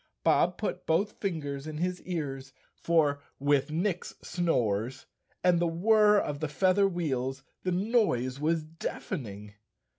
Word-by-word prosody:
Bob - - +3
put - - -4
both 195 +6 +1
fingers 150 -7 -3
in 155 -1 -5
his 180 +2 -2
ears, 135 -6 -4 0.2
for 150 -4 +2 0.2
with 145 0 +2
Nick's 175 +3 -2
snores 125 - 0 0.4
and 180 -2 +4
the 175 - +2
whir 210 +5 +4
of 145 -7 -1
the 155 - -1
feather 190 +6 +3
wheels 135 -7 -2 0.2
the 185 - -1
noise 180 - +1
was 160 +1 +1
deafening. 115 - -6
160 Hz, 130 wpm, -29 LUFS, 135-180 Hz, 0.4 s, and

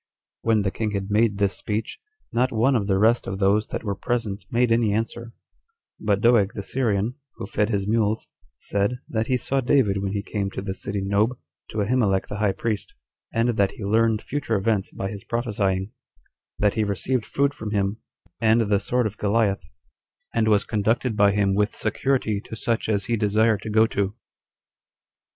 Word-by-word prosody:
When 110 -2 +2
the 95 - 0
king 105 +1 -2
had 100 +1 -3
made 105 -1 +3
this 100 -2 +1
speech, 110 +1 -4 0.3
not 125 +2 +2
one 120 +4 +3
of 100 -4 0
the 95 -2 +2
rest 115 +4 +3
of 95 - -3
those 100 +2 +2
that - - -5
were 100 -3 -1
present 110 -1 -3
made 120 0 +2
any 115 -2 +3
answer; 115 +2 -3 0.7
but 105 -1 +1
Doeg 115 -4 +4
the 100 - -4
Syrian, 110 -2 0 0.2
who - - -6
fed 105 +1 0
his 100 -3 0
mules, 110 0 +1 0.3
said, 100 +5 -1
that 110 -1 -1
he 130 - +2
saw 135 +2 -1
David 120 -7 +2
when 100 0 -2
he 100 -1 -2
came 100 -2 -2
to - - -4
the 95 -1 -3
city 100 +1 -4
Nob 105 +5 +1 0.3
to 105 -1 -1
Ahimelech 105 -4 +1
the 105 - -4
high 105 -1 +2
priest, 105 +2 -3 0.4
and 115 +1 +1
that 100 -1 +2
he 105 - -7
learned 110 +1 +2
future 140 -5 -2
events 100 -1 0
by 95 - -4
his 100 0 -7
prophesying; 100 -4 -1 0.7
that 105 -1 +2
he 110 - +1
received 105 +4 -1
food 140 0 +1
from 110 -7 -6
him, 100 0 0 0.4
and 115 +1 +4
the 105 -2 +2
sword 125 +4 0
of 105 0 -3
Goliath, 105 -3 +1 0.7
and 115 -1 +2
was 105 -2 +4
conducted 110 +3 0
by 100 -1 +5
him 100 -1 +2
with 105 +1 +1
security 110 -2 0
to - - -7
such 115 0 -1
as 100 -2 0
he 115 - 0
desired 110 0 +2
to 110 - -6
go 110 +1 +5
to. 100 -2 -1
105 Hz, 190 wpm, -24 LUFS, 100-115 Hz, 0.7 s, by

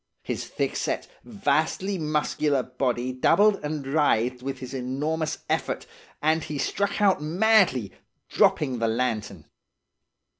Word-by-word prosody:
His - - -4
thickset, - - -2 0.2
vastly 190 -1 0
muscular 150 -2 0
body 125 -1 -2
doubled 200 +10 +4
and 150 -2 -3
writhed 125 -4 +1
with 135 +1 -4
his 130 +1 -8
enormous 150 +5 -2
effort, - - -1 0.4
and 160 +1 +2
he 150 - -5
struck 200 +9 -1
out 195 -6 +3
madly 175 - +3 0.4
dropping 130 -5 +2
the 115 - +1
lantern. 110 -7 -2
150 Hz, 115 wpm, -25 LUFS, 125-160 Hz, 0.4 s, doubled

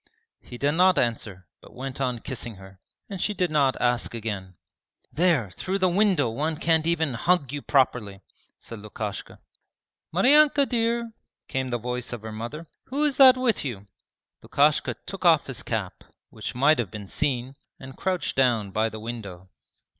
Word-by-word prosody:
He 120 - -10
did 140 +3 +1
not 180 +3 +4
answer 105 -6 -1 0.2
but - - -16
went 135 +1 -6
on 125 -3 -1
kissing 120 -4 -4
her, 95 0 -14 0.3
and 195 -3 -6
she 210 - 0
did 180 -4 0
not 140 -3 +2
ask 120 -1 0
again. 100 -5 -5 0.6
'There, 155 - +2
through 185 - -3
the 185 -1 +2
window 185 - +2
one 150 +7 -2
can't 160 0 +2
even 160 -5 +1
hug 145 +2 +1
you 145 - -4
properly,' 120 -9 +1 0.4
said 115 - -9
Lukashka. 105 0 -6 0.7
'Maryanka 280 - +5
dear!' 235 0 0 0.4
came 130 -2 -2
the 120 - -1
voice 125 +1 -4
of 115 -3 -7
her 110 - -6
mother, 120 +9 -6 0.2
'who 280 +3 -2
is 295 -3 +1
that 260 -2 +8
with 255 -3 +1
you?' 110 -8 -5 0.6
Lukashka - - +2
took - - -7
off - - +5
his - - -5
cap, - - -4 0.3
which - - -6
might 140 +3 +4
have 115 -6 -1
been 105 0 -8
seen, 130 +1 -2 0.2
and 130 0 -10
crouched 185 -2 -2
down 120 -7 +2
by 110 +3 +1
the 110 0 -8
window. 100 -5 -8
130 Hz, 170 wpm, -25 LUFS, 115-175 Hz, 0.7 s, that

